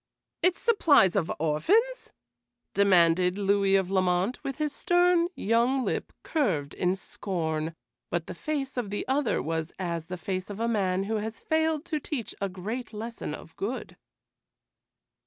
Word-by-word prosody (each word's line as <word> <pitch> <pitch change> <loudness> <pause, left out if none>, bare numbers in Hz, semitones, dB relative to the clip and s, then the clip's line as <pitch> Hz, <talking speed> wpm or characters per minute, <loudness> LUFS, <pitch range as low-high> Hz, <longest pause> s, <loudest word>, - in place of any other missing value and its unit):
"Its 360 0 +3
supplies 300 - +4
of 180 -5 +1
orphans?" 400 - +1 0.6
demanded 180 -2 +4
Louis 200 -1 +3
of 190 -1 +1
Lamont, 185 +4 +1
with 270 - -3
his 300 -2 -1
stern 350 -1 +3
young 240 +4 +2
lip - - -2
curved 160 - 0
in 180 +1 +1
scorn; 165 -5 -3 0.3
but 170 -1 -1
the - - -6
face 275 - -3
of 235 -5 -1
the 205 - -3
other 265 -2 +1
was 160 +1 -2
as 170 -3 -3
the 180 - -5
face 185 +2 -3
of 205 0 -6
a 230 - +1
man 195 -4 +1
who 220 +2 -1
has 220 +1 -4
failed 315 0 0
to 310 -3 -2
teach 270 -5 -4
a 200 - 0
great 215 +7 -5
lesson 220 -7 -5
of 165 - -13
good. 225 +7 -4
200 Hz, 155 wpm, -28 LUFS, 180-270 Hz, 0.6 s, supplies